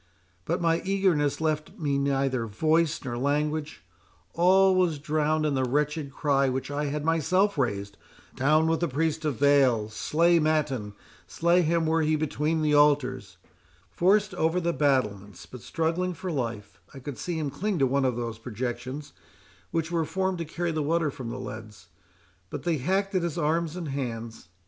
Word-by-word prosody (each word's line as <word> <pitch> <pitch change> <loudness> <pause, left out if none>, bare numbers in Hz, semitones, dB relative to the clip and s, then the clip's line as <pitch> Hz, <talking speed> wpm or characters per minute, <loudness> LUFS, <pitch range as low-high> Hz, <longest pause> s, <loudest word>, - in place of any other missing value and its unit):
—But 175 +3 -1
my 165 0 +2
eagerness 185 -7 +1
left 155 -1 -2
me 140 -3 0
neither 135 -3 0
voice 155 +8 +1
nor 120 -2 -3
language—all 150 - 0
was 180 -4 +2
drowned 155 +1 0
in 150 - +1
the 130 -1 +1
wretched 145 +2 -1
cry 140 -1 +1
which 130 +2 -3
I 145 +1 -1
had 145 +1 -3
myself 185 +5 +2
raised—Down 130 +6 -1
with 160 0 +1
the 170 - 0
priest 160 +3 -1
of 145 -6 -1
Baal! 135 -6 +4
Slay 170 +9 +2
Mattan— 145 -9 0 0.3
slay 170 +2 +2
him 165 0 +1
were 160 +1 +2
he 155 0 +2
between 155 +1 -1
the 150 -1 +2
altars!—Forced 145 - 0
over 165 0 +1
the 170 -1 0
battlements, 105 - 0
but 120 +8 -11
struggling 170 +2 -1
for 180 +3 -5
life, 115 -7 -4
I - - -8
could 135 0 -7
see 175 -2 -3
him 150 -3 -2
cling 195 +7 -2
to 135 - +3
one 135 +1 +1
of 130 -2 +1
those 115 -2 -4
projections 125 +4 -5 0.6
which 165 0 -2
were 165 -1 +1
formed 190 +1 -1
to 165 - -3
carry 170 +2 -3
the 155 -1 -1
water 155 0 +1
from 130 -4 -7
the 125 +2 -5
leads, 110 -7 -9 0.6
but - - -6
they 170 -3 +1
hacked 195 +8 0
at 185 - +2
his 170 -1 -3
arms 165 +1 0
and 170 -4 -5
hands. 115 -7 -5
150 Hz, 170 wpm, -27 LUFS, 130-165 Hz, 0.6 s, Baal